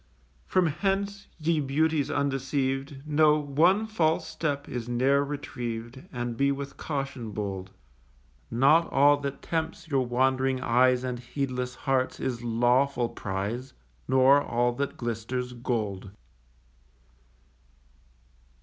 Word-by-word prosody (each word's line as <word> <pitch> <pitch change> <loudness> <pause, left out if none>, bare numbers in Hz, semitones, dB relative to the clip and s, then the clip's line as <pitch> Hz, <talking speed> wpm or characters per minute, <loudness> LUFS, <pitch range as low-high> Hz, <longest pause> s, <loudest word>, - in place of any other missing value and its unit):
From 185 -1 +3
hence, 200 +5 -1
ye 160 0 +1
Beauties 150 +1 +1
undeceived, 135 0 -1
Know, 150 0 +4
one 160 +9 +3
false 165 -7 +1
step 145 -3 -3
is 120 -1 -5
ne'er 135 +4 +3
retrieved, 125 -3 -5
And 120 -2 -3
be 140 +3 +2
with 140 0 -5
caution 135 -7 -4
bold. 95 -2 -4 0.8
Not 140 +8 +4
all 145 +1 +5
that 140 -1 -5
tempts 165 0 -3
your 135 -3 +2
wand'ring 130 +1 +1
eyes 125 0 +3
And 125 -1 -3
heedless 125 0 -3
hearts, 130 -1 0
is 120 -3 -3
lawful 120 +2 +2
prize; 105 +7 -4 0.3
Nor 130 +2 +5
all 120 -2 +1
that 140 +3 -3
glisters, 120 +2 -3
gold. 110 -6 -3
135 Hz, 115 wpm, -27 LUFS, 120-145 Hz, 0.8 s, all